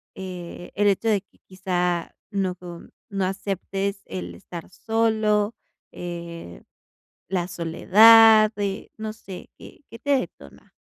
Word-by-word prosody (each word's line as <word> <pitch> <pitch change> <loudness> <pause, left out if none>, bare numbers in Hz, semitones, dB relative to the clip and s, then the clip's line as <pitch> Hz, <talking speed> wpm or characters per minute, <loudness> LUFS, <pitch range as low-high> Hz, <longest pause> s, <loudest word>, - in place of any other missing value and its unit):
eh, 180 -2 -8
el 205 +1 +2
hecho 205 +3 +2
de 210 - +3
que - - -33
quizá 180 -2 -2 0.2
no 190 -2 -1
com 175 -1 -10 0.2
no 195 -2 -1
aceptes 195 +1 -3
el 90 -2 -6
estar 165 - -9
solo, 220 0 +1 0.4
eh, 170 - -8 0.7
la 180 -2 -1
soledad, 215 +6 +7
eh, 200 -1 -3
no 220 0 -4
sé? 195 -4 -10
¿Qué - - -14
qué 230 - -11
te 285 - -2
detona? 70 - -10
190 Hz, 125 wpm, -24 LUFS, 175-210 Hz, 0.7 s, soledad